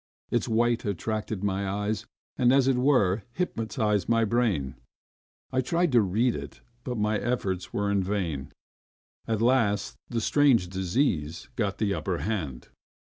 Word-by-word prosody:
Its - - +1
white 120 +1 +2
attracted 105 +1 -3
my 100 -1 0
eyes, 105 +2 -2 0.3
and, 125 0 +4
as 135 -1 +4
it 135 - +4
were, 125 -7 +3
hypnotised 110 - -1
my 115 -1 +3
brain. 105 - 0 0.8
I 130 - +2
tried 170 +5 +1
to 120 -2 +5
read 110 +5 +1
it, - - -7 0.2
but 125 -2 -3
my 105 0 +1
efforts 95 -7 -2
were 100 0 0
in 100 -1 +2
vain. 85 -8 -2 0.8
At 110 0 0
last 105 - +2
the 120 - -1
strange 120 -7 +3
disease 95 - -1
got 100 -5 -1
the 105 -2 0
upper - - -2
hand. 80 - -3
105 Hz, 145 wpm, -27 LUFS, 95-120 Hz, 0.8 s, to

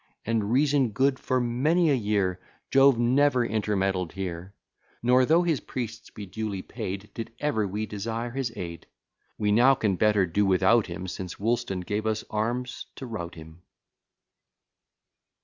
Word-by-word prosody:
And 110 -2 0
reason 140 -1 +3
good; 130 +5 +1
for 130 - 0
many 150 +8 +2
a - - +4
year 100 -6 0 0.3
Jove 135 -2 +6
never 125 +1 +3
intermeddled 95 -5 -1
here: 95 0 -6 0.5
Nor, 125 +1 +4
though 165 +3 +4
his 165 -5 +1
priests 115 -3 -6
be 105 - -8
duly 100 -1 -4
paid, 95 +2 -6
Did 115 - -6
ever 110 -9 0
we 105 +3 -3
desire 115 +3 -4
his 130 -2 -2
aid: 85 -2 -7 0.5
We 105 -1 +1
now 125 +6 +6
can 105 -7 0
better 105 -2 +3
do 90 +4 +1
without 95 +4 +3
him, 95 +1 -6
Since 90 0 -6
Woolston 110 -3 -1
gave 105 +4 -2
us 110 0 -1
arms 120 +4 -2
to 135 - -7
rout 90 -8 -6
him. 80 +1 -12
110 Hz, 150 wpm, -27 LUFS, 95-125 Hz, 0.5 s, Jove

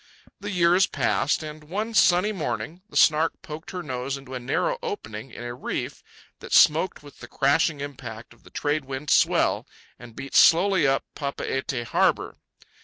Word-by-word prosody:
The 205 +1 -6
years 180 0 +3
passed, 145 +4 0
and, 155 0 -8
one 210 +8 -4
sunny 185 0 +4
morning, 175 -2 -4
the - - -5
Snark 160 +1 +3
poked 155 +1 -8
her 180 -2 -5
nose 130 -1 -4
into 135 -1 -11
a 130 - -3
narrow 485 - -1
opening 135 - -6
in 120 - -10
a 120 0 -5
reef 125 - -5 0.4
that - - -8
smoked 160 +2 +4
with 145 - -15
the - - -10
crashing 145 +1 +1
impact 120 -6 -8
of 120 - -25
the - - -17
trade 145 -1 -2
wind 135 +2 -5
swell, - - +3 0.3
and 120 -2 -13
beat 135 - -8
slowly 175 -2 +5
up 135 0 +1
Papeete 135 -3 -3
harbour. 115 - 0
150 Hz, 170 wpm, -25 LUFS, 135-175 Hz, 0.4 s, slowly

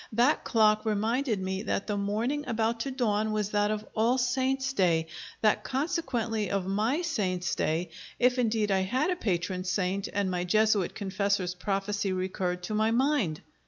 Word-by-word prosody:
That 245 +7 +3
clock 215 -2 +3
reminded 220 +2 0
me 190 0 -2
that 205 -2 -2
the 210 - -2
morning 220 +9 -1
about 225 0 0
to 275 - -2
dawn 220 -5 0
was 210 -1 -1
that 205 0 +2
of 215 0 -2
All 230 +4 +3
Saints' 265 +1 0
Day; 170 -7 +2 0.4
that 215 -1 +3
consequently 255 - -1
of 195 -2 -1
my 220 - 0
saint's 185 - -1
day 165 +2 -1 0.3
if 250 +1 +3
indeed 220 -3 +1
I 190 - +3
had 255 - 0
a - - +1
patron 185 - -2
saint 185 +1 -1
and 200 -2 0
my 180 -1 -1
Jesuit 210 0 +2
confessor's 200 -2 -1
prophecy 195 +2 -2
recurred 185 -1 -2
to 195 - -4
my 215 +1 +2
mind. 235 - +1
210 Hz, 165 wpm, -28 LUFS, 190-240 Hz, 0.4 s, That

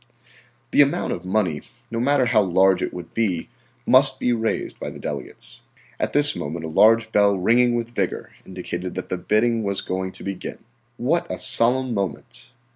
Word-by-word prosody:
The - - +6
amount 145 +5 +1
of 90 - -7
money, 90 -6 0 0.3
no 115 - -2
matter 135 +1 +3
how 110 - +3
large 95 0 +3
it - - -2
would 85 -2 -9
be, 95 -7 -1 0.4
must 130 0 +4
be 125 - +1
raised 115 -1 -2
by - - -4
the - - -10
delegates. - - -7 0.4
At - - -1
this 145 0 +2
moment 80 +3 -5
a - - -5
large 110 +6 +4
bell 100 -2 +3
ringing 120 +6 +3
with 120 0 -3
vigor 95 -5 -3
indicated 90 -1 -6
that 95 - -5
the 95 - -2
bidding 110 +5 +1
was 100 -1 -1
going 95 0 -3
to - - -11
begin. 95 -2 -6 0.3
What 155 +8 0
a - - -3
solemn 125 +2 +2
moment! 120 +5 -5
110 Hz, 180 wpm, -22 LUFS, 95-120 Hz, 0.4 s, The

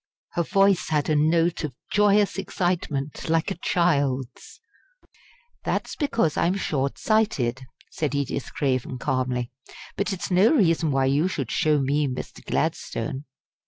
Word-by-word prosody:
Her 175 - 0
voice 195 +1 +2
had 150 -2 0
a - - +3
note 165 +3 +2
of 145 -5 -4 0.2
joyous 205 -1 +3
excitement 170 -7 -2
like 165 0 +1
a - - -4
child's. 140 -7 0 1.0
"That's - - -2
because 230 - 0
I'm 175 +3 +2
short 140 -7 -1
sighted," 145 - +1 0.3
said 145 -3 -2
Edith 140 -1 -2
Craven, 130 -2 -1
calmly; 130 -2 -1 0.4
"but 200 +2 -1
it's 190 0 -4
no 195 - +5
reason 165 - +3
why 135 -1 +2
you 140 +6 +2
should 140 -10 -3
show 155 -1 +2
me 145 +2 +1
Mr. 130 -1 -6
Gladstone." 130 +5 -2
150 Hz, 135 wpm, -25 LUFS, 135-180 Hz, 1.0 s, no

